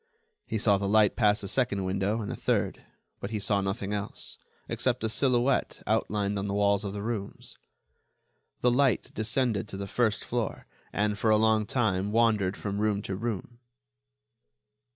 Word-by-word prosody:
He 110 - -1
saw 100 -2 +3
the 100 - -1
light 105 -1 +4
pass 105 -2 +3
a - - -4
second 100 -3 0
window 100 +4 0
and 100 - -4
a - - -3
third, - - -1 0.4
but 100 - -5
he 110 - -2
saw 100 0 +1
nothing 95 +1 -3
else, 100 0 -5 0.3
except 125 -2 -1
a 110 - +1
silhouette 125 +2 +1
outlined 100 -1 0
on 100 - -3
the 100 - -2
walls 100 0 +2
of 100 - -3
the 100 -1 -5
rooms. 110 -3 -5 1.1
The 125 - +4
light 130 -1 +2
descended 110 -1 0
to 95 - -7
the 100 - -4
first 110 +1 0
floor, 120 -2 -3 0.3
and, 105 0 0
for 110 - +2
a 110 - +5
long 110 -1 +3
time, 100 -5 0
wandered 110 -4 +2
from 100 -1 -3
room 105 -1 +1
to 95 - -3
room. 115 +2 -4
105 Hz, 175 wpm, -28 LUFS, 100-115 Hz, 1.1 s, a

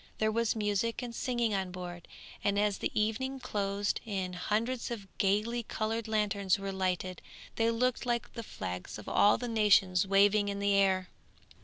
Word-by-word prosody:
There 220 0 +1
was 230 +1 +1
music 215 +3 -1
and 240 -1 -5
singing 240 -2 0
on 190 -2 -1
board, 175 -1 -7 0.4
and 200 0 +1
as 205 -1 +1
the - - -1
evening 260 +6 -1
closed 205 -4 -1
in 190 -5 -3
hundreds 225 +7 -1
of 220 -5 -6
gaily 215 +4 +1
coloured 225 0 -3
lanterns 205 -3 +1
were 195 0 -4
lighted 185 -1 -2 0.3
they 225 0 +2
looked 245 +2 0
like 240 -2 -2
the 230 - -5
flags 90 - -6
of 105 - -11
all 205 - +4
nations 205 -6 +3
waving 205 +1 +4
in 200 - -3
the 200 0 +1
air. 190 -2 +2
205 Hz, 165 wpm, -31 LUFS, 195-230 Hz, 0.4 s, all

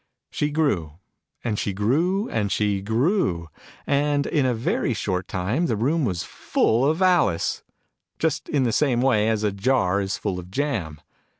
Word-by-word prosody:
She 150 - -1
grew, 140 - 0 0.5
and 110 -3 -1
she 100 - -2
grew, 165 - +1
and 105 -3 -1
she 100 -2 0
grew. 110 - 0 0.4
And 145 0 +1
in 140 -4 +1
a 125 - +1
very 115 +1 -1
short 90 -3 -2
time 105 - -1
the 115 - 0
room 140 +8 +1
was 90 -6 -2
full 120 +10 +1
of 160 +4 0
Alice: 170 - +2 0.6
just 160 -3 -1
in 145 -3 +1
the 120 -3 0
same 130 -5 +2
wav 110 -5 +3
as 110 -1 0
a 105 - +1
jar 100 -2 +1
is 95 0 -2
full 90 - -3
of 90 0 -10
jam 95 - -2
115 Hz, 170 wpm, -24 LUFS, 100-145 Hz, 0.6 s, wav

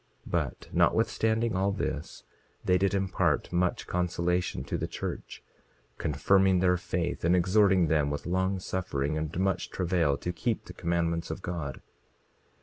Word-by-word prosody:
27:33 - - -9
But - - -2
notwithstanding 110 0 +2
all 95 +2 +2
this, 75 -6 -4 0.4
they 90 0 +3
did 100 0 +2
impart 95 -1 0
much 90 0 +1
consolation 90 -4 -1
to - - -4
the - - -2
church, - - -6 0.6
confirming 95 +5 +3
their 90 0 +3
faith, 85 -1 -2
and 85 +2 +4
exhorting 95 0 +4
them 75 -2 +2
with 75 0 -4
long 95 +2 0
suffering 75 -6 -2
and 80 +2 -3
much 95 -1 0
travail 85 -6 +1
to 90 - -4
keep 115 +5 -2
the 90 - -9
commandments 85 -1 -1
of 90 - -5
God. 80 -7 -4
90 Hz, 145 wpm, -29 LUFS, 85-95 Hz, 0.6 s, and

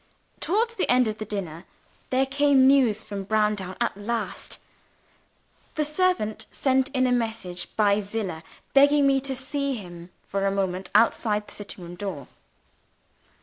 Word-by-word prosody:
Towards 460 +6 0
the - - 0
end 250 -1 +4
of 215 0 -4
the 215 - -4
dinner, 190 -5 -5 0.4
there 260 +1 +2
came 275 -1 +4
news 260 -6 +4
from 200 -1 -5
Browndown 210 -2 0
at - - 0
last. 205 -1 -4 1.2
The 305 - +1
servant 295 - 0
sent 265 -1 +1
in 260 -2 +1
a 250 - +2
message 220 -7 -2
by 205 -1 +3
Zillah, 200 -5 -4 0.3
begging 285 +1 +6
me 275 0 +4
to 270 0 -3
see 280 +1 -2
him 175 -5 -9 0.2
for 195 0 -1
a - - +1
moment 190 -1 -2
outside 210 -1 +3
the - - -12
sitting 200 -3 -9
room 175 0 -8
door. 175 -7 -6
220 Hz, 150 wpm, -25 LUFS, 195-270 Hz, 1.2 s, begging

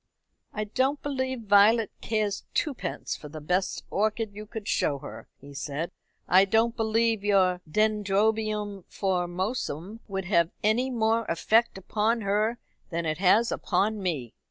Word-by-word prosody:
"I 215 - -3
don't 260 +7 0
believe 260 -3 -2
Violet 210 +2 +5
cares 215 -2 -1
twopence 295 -6 -2
for 150 - -10
the 155 +1 -8
best 180 +5 -1
orchid 215 +1 0
you 210 +1 -9
could 220 -2 -7
show 145 - +1
her," - - -10
he 140 +1 -13
said. 145 +4 -4 0.4
"I 185 +2 +6
don't 225 +4 +2
believe 225 -1 +1
your 185 -3 +3
Dendrobium 210 0 0
Formosum 185 - -2
would 195 -2 -3
have 170 -3 +3
any 230 +5 +2
more 225 -2 +1
effect 220 +7 +2
upon 215 +4 0
her 210 +3 +1 0.3
than 170 -2 -2
it 155 +1 -1
has 210 +5 +4
upon 210 +1 0
me." 150 - -3
210 Hz, 140 wpm, -27 LUFS, 185-225 Hz, 0.4 s, I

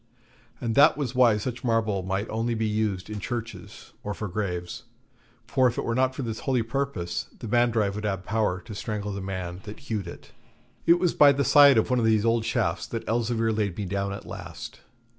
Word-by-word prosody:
And 115 -2 -2
that 145 +6 +6
was 135 -5 -2
why 120 -4 +5
such 120 +3 -5
marble 110 -5 +1
might 95 +3 -2
only 115 +1 -1
be 110 0 -1
used 105 -3 -1
in 105 -1 -5
churches 115 +2 -7
or 105 -1 -4
for 105 - -4
graves, 90 -3 -4 0.6
for 130 -2 +3
if 120 - -2
it - - -1
were 115 - 0
not 130 +1 +1
for 135 - -4
this 115 -2 -4
holy 130 -4 0
purpose, 115 -8 -3
the 115 - -7
Mandrive 115 -3 +2
would 105 +1 -5
have 95 -3 -2
power 105 -4 0
to 110 - -10
strangle 105 0 -4
the 100 0 -5
man 95 -2 -5
that 105 0 -8
hewed 110 -9 -4
it. - - -11 0.6
It 170 +1 +7
was 175 -1 +1
by 145 -1 +7
the 140 0 0
side 140 -3 +7
of 110 - +2
one 125 - +3
of 115 - +1
these 110 -1 +3
old 115 -1 +2
shafts 115 -7 -1
that 115 - -5
Elzevir 115 0 0
laid 105 -5 -1
me 105 - -3
down 100 +1 -2
at 100 - -7
last. - - -8
110 Hz, 215 wpm, -26 LUFS, 100-120 Hz, 0.6 s, It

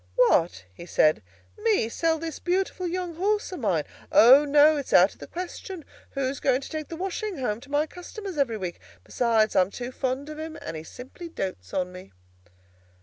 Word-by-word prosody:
"What?" 175 - +3
he 170 - -11
said, 155 -8 +3 0.4
"me 425 - +2
sell 325 +7 0
this 325 -1 -6
beautiful 365 0 -1
young 350 -1 -4
horse 415 +3 0
of 365 - -6
mine? 185 - +1 0.3
O, 265 +6 +8
no; 295 +2 +6
it's 280 - -4
out 185 +3 +6
of - - -24
the - - -9
question. 360 -1 -7 0.3
Who's 270 0 -2
going 265 0 +2
to - - -8
take 310 -2 -4
the 330 - -6
washing 385 +3 -3
home 230 -4 -2
to 280 - -14
my 290 +2 +2
customers 365 +3 -8
every 235 -6 +1
week? 180 -4 -5 0.2
Besides, 225 -3 +1
I'm 185 0 +4
too 245 +4 -6
fond 260 +2 -2
of 305 0 -7
him, 320 0 -6
and - - -6
he 155 - -5
simply 260 - -10
dotes 140 - -5
on 180 -1 -1
me." 180 - -12
280 Hz, 195 wpm, -26 LUFS, 215-345 Hz, 0.4 s, O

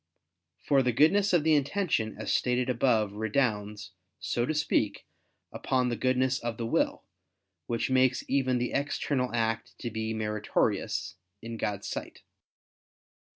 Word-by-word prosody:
For 140 -2 +2
the 125 -1 +1
goodness 160 - +4
of 175 -4 +3
the 160 0 +4
intention, 145 - 0
as 110 - -2
stated 125 0 +1
above, 115 -4 +2
redounds, 105 -2 -1 0.3
so 120 0 -1
to 155 - 0
speak, 150 - 0 0.5
upon 130 -1 0
the 120 - -1
goodness 130 +1 +1
of 115 -1 -4
the 115 - -3
will, 115 - 0 0.6
which 120 +2 -1
makes 130 -1 +3
even 130 -2 +1
the 120 0 -1
external 140 -2 -1
act 115 0 -2
to 120 - -5
be 110 +1 -3
meritorious 105 -3 -1 0.3
in 115 0 -5
God's 105 -2 -3
sight. - - -6
125 Hz, 140 wpm, -29 LUFS, 110-135 Hz, 0.6 s, goodness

